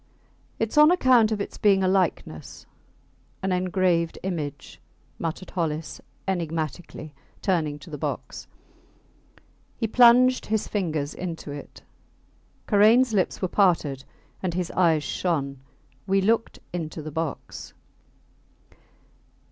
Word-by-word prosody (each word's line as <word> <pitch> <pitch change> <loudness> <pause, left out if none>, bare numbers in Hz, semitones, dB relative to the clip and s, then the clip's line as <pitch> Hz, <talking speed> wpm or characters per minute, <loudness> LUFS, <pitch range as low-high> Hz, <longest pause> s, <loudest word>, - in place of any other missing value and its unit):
Its 225 +6 +1
on 300 +1 +8
account 255 -10 +4
of 215 - -1
its 200 - -5
being 195 -2 +4
a - - +2
likeness 180 - -1 0.8
an 190 - 0
engraved 180 -2 +1
image, 150 -7 -5 0.4
muttered 165 +3 -4
Hollis, 155 -4 -3 0.3
enigmatically, 165 -3 -4 0.3
turning 160 -6 0
to 150 +3 -13
the 150 - -6
box. - - -5 1.3
He 225 - -1
plunged 250 +3 +5
his 220 0 -1
fingers 160 -8 -2
into 165 -4 -6
it. 145 0 -10 0.8
Karains 225 +4 +5
lips 190 -1 0
were - - +2
parted 165 -9 +1 0.4
and 180 -3 -2
his 180 -1 -2
eyes 165 -4 +2
shone. 140 -8 -2 0.5
We 195 0 +3
looked 225 +4 +1 0.2
into 160 -2 -5
the 155 - -6
box. 160 0 -5
180 Hz, 115 wpm, -25 LUFS, 155-205 Hz, 1.3 s, on